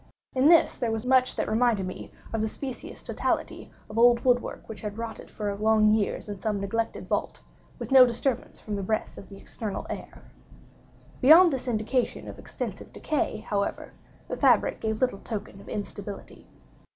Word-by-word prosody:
In 265 +3 +4
this 335 -1 +5
there 240 -3 -1
was 225 +1 -3
much 255 0 +3
that - - -1
reminded 220 -3 +2
me 185 - -7 0.2
of 225 - 0
the 220 - +1
specious 260 +3 -7
totality - - -2 0.2
of 215 +2 -4
old 240 0 +6
wood 245 -1 +4
work - - -8
which 220 - -8
has 210 -2 -4
rotted 230 +1 -7
for 205 -2 -3
long 215 0 +4
years 215 -1 -1
in 205 -2 -6
some 210 0 -1
neglected 225 +3 -3
vault, - - -2 0.4
with - - -7
no 265 -1 +10
disturbance 245 +1 -1
from 210 - -5
the 200 - -3
breath 215 +3 -2
of - - -13
the 195 - -11
external 210 0 -5
air. - - -8 1.0
Beyond 320 +5 +8
this 260 -1 -4
indication 235 +2 -1
of - - -9
extensive - - -6
decay, 300 -7 -2
however, 200 -2 -2 0.3
the - - -4
fabric - - +3
gave 220 -1 -2
little 250 -6 +1
token 200 -2 -6
of - - -13
instability. 205 -1 -7
220 Hz, 175 wpm, -27 LUFS, 210-250 Hz, 1.0 s, no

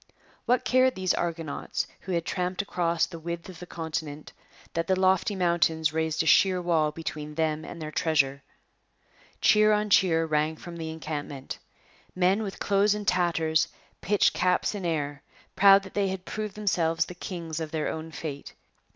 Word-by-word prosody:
What 250 +1 +2
cared 255 0 +3
these 185 -1 +1
argonauts, 165 -3 -3
who 190 - -5
had 170 -1 0
tramped 180 +1 -2
across 170 -3 0
the 170 - -9
width 170 +2 -5
of 180 -3 -10
the 180 - -9
continent, 155 -3 -5 0.4
that 165 0 -1
the 190 -1 +2
lofty 190 +2 +2
mountains 165 -4 +1
raised 160 0 0
a - - -7
sheer 185 +3 +5
wall 165 -4 +1
between 150 -1 -6
them 155 -1 0
and 170 - -8
their 155 -1 -5
treasure? 140 -3 +1 1.0
Cheer 215 0 +5
on 210 0 0
cheer 165 -4 +4
rang 155 0 0
from 170 +2 -9
the 160 -1 -5
encampment. 150 -4 -6 0.6
Men 185 +3 +2
with 200 -3 -5
clothes 205 +1 +2
in 210 -1 -5
tatters 165 -4 +2 0.3
pitched 205 0 +3
caps 180 +3 +1
in 195 -4 -3
air, 145 -3 -2 0.3
proud 195 0 +7
that 190 - -11
they 200 -1 +1
had 190 -1 -4
proved 215 -2 -5
themselves 165 -6 +1
kings 165 -4 -5
of 160 -1 -4
their 155 -1 -2
own 160 +1 -4
fate. 145 -3 -7
170 Hz, 170 wpm, -27 LUFS, 160-190 Hz, 1.0 s, proud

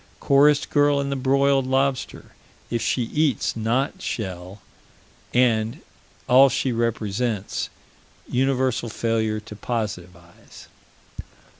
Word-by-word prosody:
Chorus 145 +1 +4
girl 145 -1 +2
and 140 0 -2
the - - -1
broiled 135 0 +2
lobster. 135 0 -1 0.4
If 115 -1 -1
she 120 +2 0
eats 145 0 0
not 115 +5 -1
shell 95 -2 -5 0.7
and 115 -3 +1 0.5
all 135 +2 +7
she 130 +1 -1
represents 115 -2 -2 0.6
universal 130 -2 0
failure 110 -1 -1
to 105 0 -11
positivize. 90 -7 -7
120 Hz, 100 wpm, -23 LUFS, 110-135 Hz, 0.7 s, all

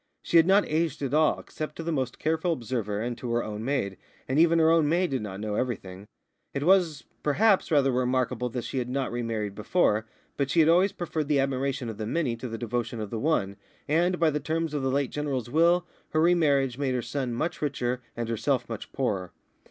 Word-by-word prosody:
She 170 - +3
had 165 +1 +6
not 200 +2 +5
aged 160 -2 -1
at 135 - -2
all, 155 0 +3
except 155 - -6
to 165 - -6
the 165 - -2
most 130 -6 -2
careful 160 +2 0
observer 115 -6 -3
and 120 +2 -2
to 125 - -5
her 120 - +1
own 105 0 -5
maid, 115 -8 -1 0.3
and 130 +3 +1
even 170 0 +5
her 160 0 +5
own 165 -3 +4
maid 175 +1 +1
did 130 -3 -1
not 100 -2 -6
know 105 0 -3
everything. 100 -5 -4 0.5
It 140 - -1
was, 170 -5 +3 0.2
perhaps, 195 +7 +3
rather 140 -4 +3
remarkable 125 -1 0
that 120 0 -4
she 135 - -3
had 125 0 -3
not 135 +1 -1
re 120 +1 -2
married 110 -3 -3
before, 110 - +1 0.3
but 140 -1 0
she 165 - +2
had 160 0 +6
always 185 +4 +4
preferred 160 -3 -3
the 145 -2 +2
admiration 135 -1 -1
of 110 -1 -6
the 110 - -3
many 135 -3 0
to 125 - -6
the 115 -1 -5
devotion 120 0 -3
of 105 -2 -5
one, 110 -6 0 0.3
and, 175 +4 +2
by 165 -2 +4
the 150 - -1
terms 160 +2 -2
of 145 - -1
the 135 - 0
late 140 -1 0
General's 135 -5 -3
will, 170 +3 +4 0.3
her 155 - +3
re 175 +2 +5
marriage 140 -6 +2
made 135 -3 0
her 125 - -1
son 125 +1 -3
much 160 +9 -2
richer 125 -4 -1 0.2
and 120 -1 -2
herself 115 +4 0
much 115 -3 -7
poorer. 100 -9 -1
135 Hz, 225 wpm, -27 LUFS, 120-160 Hz, 0.5 s, had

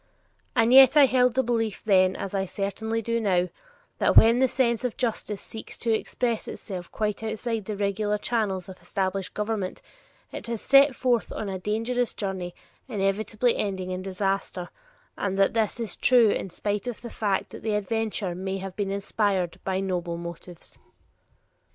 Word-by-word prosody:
And 230 0 +4
yet 265 +1 +9
I 290 - +9
held 250 -2 +3
the 265 - +3
belief 225 -3 -1
then, 185 -3 +4
as 195 - -5
I 195 -1 -1
certainly 220 +4 -3
do 230 +1 0
now, 180 -4 +2 0.5
that - - +3
when 230 +2 +8
the 260 - +5
sense 235 -2 +1
of 250 -3 -2
justice 220 -4 -2
seeks 220 - -8
to 230 -2 0
express 230 +1 -1
itself 180 -3 -7
quite 210 -1 -2
outside 220 0 -3
the 210 -1 -4
regular 205 +1 0
channels 205 -5 -1
of 190 -2 -11
established 190 +1 -2
government, 210 -3 -2 0.5
it - - -7
has 230 -1 -3
set 275 +2 +5
forth 245 -4 +1
on 210 - -4
a 190 -1 -4
dangerous 230 +5 -1
journey 190 -3 -4 0.3
inevitably 215 +2 0
ending 190 -2 -2
in 185 0 -3
disaster, 195 -1 -2 0.5
and 195 -1 -1
that 195 0 +3
this 225 +1 0
is 230 -3 -1
true 240 -4 +5
in 195 - -2
spite 205 +5 -3
of 245 - -5
the 235 - -8
fact 200 -3 -1
that - - -9
the 215 -1 -1
adventure 210 -2 -1
may 190 +2 -3
have 190 -1 -7
been 200 -2 -2
inspired 195 -3 -1
by 190 0 -1
noble 175 -3 -2
motives. 170 0 -9
210 Hz, 170 wpm, -26 LUFS, 190-230 Hz, 0.5 s, yet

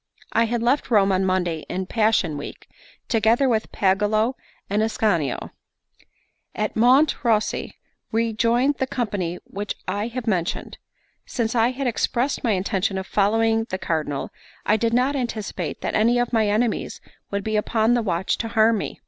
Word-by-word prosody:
I 230 - +4
had 230 0 -1
left 255 +5 +1
Rome 200 -4 +4
on 190 0 +2
Monday 180 -3 0
in 185 +1 -2
Passion 215 -7 +1
Week, 145 - -8 0.4
together 230 +3 +3
with 220 -3 0
Pagolo 210 +5 +2 0.3
and 205 +2 0
Ascanio. 205 - 0 1.0
At 215 0 -2
Monte 255 +7 +5
Ruosi 220 -5 0 0.4
we 225 0 0
joined 240 +6 +2
the 265 - 0
company 200 -9 -2
which 205 +1 -5
I 205 +4 -1
have 240 0 -5
mentioned. 180 -7 -2 0.5
Since 230 -3 -1
I 230 0 +3
had 265 +2 -4
expressed 245 +2 0
my 230 -4 +2
intention 195 +1 -1
of 190 - -3
following 225 +3 +2
the 185 -5 -4
Cardinal, 155 -6 -2 0.3
I 210 - +4
did 230 +1 0
not 255 +4 +2
anticipate 235 -6 -4
that - - -2
any 230 +3 +3
of 245 0 0
my 220 -2 +3
enemies 215 +2 0 0.3
would 200 0 -2
be 220 +1 -2
upon 220 +2 +2
the 240 - +2
watch 190 -3 -1
to 230 - -2
harm 225 -1 +3
me. - - -6
220 Hz, 165 wpm, -23 LUFS, 195-235 Hz, 1.0 s, Monte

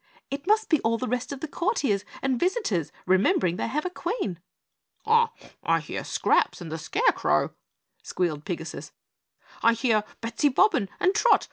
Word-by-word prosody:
"It 280 +4 -5
must 435 +1 +3
be 315 - +3
all 230 +1 +1
the 255 - -3
rest 250 +3 -2
of 275 -1 -6
the 320 - -3
courtiers 290 - 0 0.2
and 260 -3 +1
visitors 350 - 0
remembering 185 -1 +3
they - - -1
have 300 +7 -2
a 365 - -2
Queen!" 210 - -3 0.7
"I 460 +1 +4 0.5
hear - - -5
Scraps - - +1
and 170 -3 -8
the 160 - -4
Scarecrow," 455 - +1 0.5
squealed 160 -5 -2
Pigasus, 165 -3 -6 0.7
"I 230 - +5
hear 230 -3 +2 0.2
Bettsy 235 +6 +1
Bobbin 260 - +3
and 370 - +3
Trot. 455 +3 +5
250 Hz, 155 wpm, -26 LUFS, -, 0.7 s, I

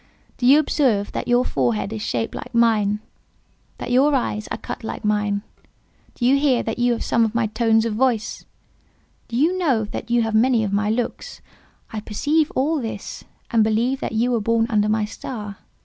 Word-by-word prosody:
Do 245 - +2
you 275 +3 +8
observe 255 -9 +1
that - - -4
your 245 +1 +3
forehead 115 -7 -1
is 110 - -5
shaped 115 +1 -2
like - - -8
mine—that 220 +1 -2
your 275 +4 +4
eyes 215 -4 -2
are - - -4
cut - - -7
like 220 - -6
mine? 210 -1 0 0.7
Do 240 - -2
you 270 +3 +4
hear 275 -4 +2
that 225 +2 -4
you 245 0 +3
have 235 - -3
some 235 - +2
of 225 0 -1
my 235 -1 +2
tones 225 +1 +2
of 230 - -1
voice? 235 -1 0 0.8
Do 230 - -6
you 325 +7 +3
know 265 -11 +2
that 225 +2 -7
you 235 0 +3
have 225 -1 -2
many 230 +1 +3
of 200 -2 -2
my 210 +1 +1
looks? 245 - -3 0.5
I 220 - -2
perceive 290 +9 0
all 295 +3 +1
this, 225 - -6 0.3
and 225 -2 +4
believe 230 +5 +1
that - - -4
you 235 +3 +1
were 235 -2 +1
born 230 +1 +2
under 210 -1 +2
my 215 0 +1
star. 210 -2 -7
230 Hz, 195 wpm, -22 LUFS, 210-250 Hz, 0.8 s, you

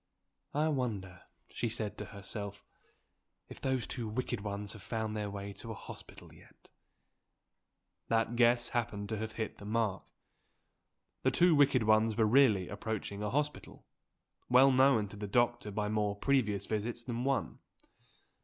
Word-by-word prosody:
"I 150 +2 +2
wonder," 105 - -3 0.3
she 120 - -2
said 110 -2 -3
to 105 - -4
herself, 100 +1 -7 0.9
"if - - -11
those 130 -3 0
two 120 -4 -4
wicked 120 0 -2
ones 100 0 -4
have 105 - -11
found 110 +2 -3
their 105 -1 -2
way 100 0 -6
to 115 - -10
a 110 - -4
hospital - - -11
yet?" - - -20 1.4
That 115 +1 +1
guess 120 0 +4
happened 110 -4 -2
to 110 - -2
have 110 +1 -4
hit 110 -2 -4
the 100 - -10
mark. 110 -2 0 1.2
The - - +3
two 175 -1 +4
wicked 140 -5 +4
ones 110 0 +3
were 110 - +4
really 105 -6 +4
approaching 100 -1 -4
a 105 - -1
hospital, 150 +5 -3 0.6
well 130 +2 +7
known 130 -5 +4
to 105 - -10
the 105 0 -4
doctor 120 0 +1
by 105 0 -2
more 105 -1 0
previous 105 -5 +1
visits 115 +2 -3
than 120 0 -3
one. 135 0 -1
110 Hz, 155 wpm, -33 LUFS, 105-120 Hz, 1.4 s, well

